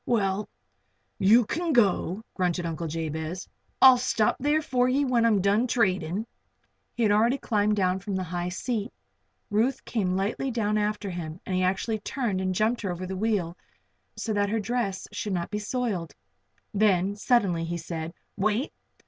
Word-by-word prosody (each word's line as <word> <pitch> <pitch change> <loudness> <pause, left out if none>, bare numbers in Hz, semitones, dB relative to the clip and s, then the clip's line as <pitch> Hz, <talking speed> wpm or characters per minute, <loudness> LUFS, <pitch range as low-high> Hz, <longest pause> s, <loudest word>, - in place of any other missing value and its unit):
"Well, 205 -3 0 0.7
you 220 +5 +6
can 330 +7 -1
go," 205 -3 +2
grunted 180 -2 0
Uncle 165 0 -3
Jabez. 160 +2 -4 0.4
"I'll 260 -2 +9
stop 230 -3 +2
there 295 +3 +2
for 250 -3 +2
ye 280 +3 +2
when 240 -3 +3
I'm 210 -4 +3
done 205 +6 +2
tradin'." 190 -4 0 0.7
He 235 - 0
had 210 - +4
already 230 +6 +3
climbed 210 -4 +1
down 185 -2 +1
from 200 0 -4
the 190 - -1
high 175 0 -3
seat. 220 +4 -3 0.6
Ruth 230 +6 +1
came 190 -6 0
lightly 205 +7 -1
down 215 -3 0
after 210 -1 -2
him 165 -1 -6
and 190 - -3
he 185 - +1
actually 190 +4 0
turned 210 -4 -2
and 185 -1 -1
jumped 220 +5 +1
her 200 - -2
over 175 +1 -5
the 190 +1 -4
wheel 190 -4 0 0.6
so 220 - -2
that 205 -1 +1
her 225 +2 0
dress 210 -4 -2
should 205 - -3
not 175 -2 -2
be 210 - -2
soiled. 210 -6 -3 0.6
Then, 200 -2 +2
suddenly, 205 -6 +2
he 170 +1 -3
said: 160 -1 -5 0.2
"Wait. 215 +6 0
205 Hz, 170 wpm, -27 LUFS, 185-230 Hz, 0.7 s, I'll